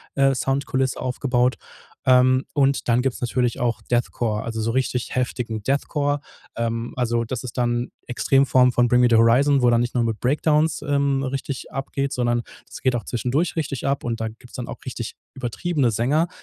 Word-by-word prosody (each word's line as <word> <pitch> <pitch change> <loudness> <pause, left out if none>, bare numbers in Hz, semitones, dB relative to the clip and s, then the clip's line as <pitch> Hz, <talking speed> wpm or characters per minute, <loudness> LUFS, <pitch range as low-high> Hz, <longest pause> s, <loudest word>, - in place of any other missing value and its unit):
äh, 135 -1 +4
Soundkulisse 135 -1 -1
aufgebaut. 125 -1 0 0.5
Ähm, 130 0 +5
und 140 -2 +1
dann 120 +1 +4
gibt's 130 -1 -2
natürlich 125 -1 0
auch 120 -1 -1
Deathcore, 120 -3 -1
also 115 -1 -4
so 115 +1 0
richtig 125 -1 -1
heftigen 120 -3 -2
Deathcore. 145 +2 0 0.3
Ähm, 115 0 -2
also 120 -2 0
das 125 +2 -4
ist 125 - -8
dann, 120 0 +1 0.2
äh, - - -6
Extremform 130 -1 +4
von 120 0 +3
Bring 125 +1 +4
me 125 - +6
the 115 - +5
Horizon, 130 +5 +4
wo 120 - +5
dann 120 0 +3
nicht 120 - -2
nur 120 - +2
mit 110 -2 -2
Breakdowns, 150 +4 +2
ähm, 140 -1 +1
richtig 135 0 -4
abgeht, 135 +1 -2
sondern 120 -1 +1 0.3
das - - -10
geht 130 -2 +2
auch 115 - -2
zwischendurch 125 - -1
richtig 140 -4 -3
ab 140 0 0
und 115 -1 -2
da 110 - -1
gibt's 115 +3 -16
dann 125 - -5
auch - - -6
richtig 120 -3 -5 0.2
übertriebene 130 +2 -1
Sänger, 140 - +1
125 Hz, 185 wpm, -23 LUFS, 120-135 Hz, 0.5 s, me